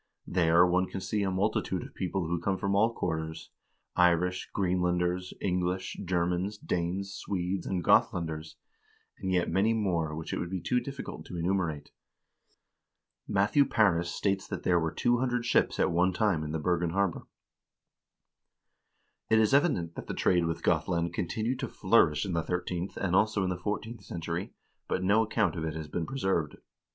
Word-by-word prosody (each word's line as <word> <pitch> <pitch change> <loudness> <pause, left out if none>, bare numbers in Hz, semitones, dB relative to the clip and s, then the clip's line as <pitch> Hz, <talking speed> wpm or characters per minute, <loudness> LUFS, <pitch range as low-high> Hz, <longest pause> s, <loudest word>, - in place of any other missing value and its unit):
There 85 -1 +4
one 90 +1 +2
can 95 - -5
see 105 +2 -2
a 100 - +1
multitude 95 +3 0
of - - -11
people 95 -1 -2
who 85 +1 -2
come 95 +1 0
from 100 0 -1
all 110 +3 +4
quarters; 80 -6 -4 0.4
Irish, 90 +1 +2
Greenlanders, 90 -1 0
English, 90 0 -1
Germans, 90 +3 0
Danes, 95 +1 -2
Swedes, 95 -2 -3
and 90 -2 -1
Gothlanders, 80 -1 +1 0.6
and 95 - -2
yet 90 -1 +2
many 100 +6 +3
more 85 -8 0
which 80 0 -5
it - - -1
would 85 - -3
be 95 0 -3
too 105 +10 +1
difficult 135 +3 -7
to 90 - -6
enumerate." 85 -4 -1 1.4
3 - - -5
Matthew 105 +9 +4
Paris 95 -9 +2
states 95 +1 -1
that - - -5
there 90 -1 +3
were 80 -1 -1
200 120 +2 +1
ships - - +2
at - - +3
one 90 +2 +2
time 95 -6 +1
in 75 - -4
the 80 - -1
Bergen 85 +2 0
harbor.4 95 0 -1 2.0
It 110 - +5
is 110 +3 +3
evident 140 - +2
that - - -8
the - - -4
trade 90 -2 +2
with 80 0 -3
Gothland 85 +1 +1
continued 110 +8 -2
to - - -2
flourish 75 +6 +3
in 95 - -3
the 85 - +1
thirteenth 90 +2 -3
and 90 -2 0
also 105 0 +3
in 90 - 0
the - - -1
fourteenth 105 +4 -4
century, 85 +1 -5 0.3
but - - -1
no 100 +4 +4
account 110 -6 0
of 80 - -3
it 80 -1 -3
has 80 -1 -5
been 80 +2 -3
preserved. 95 - -1
90 Hz, 170 wpm, -29 LUFS, 85-100 Hz, 2.0 s, It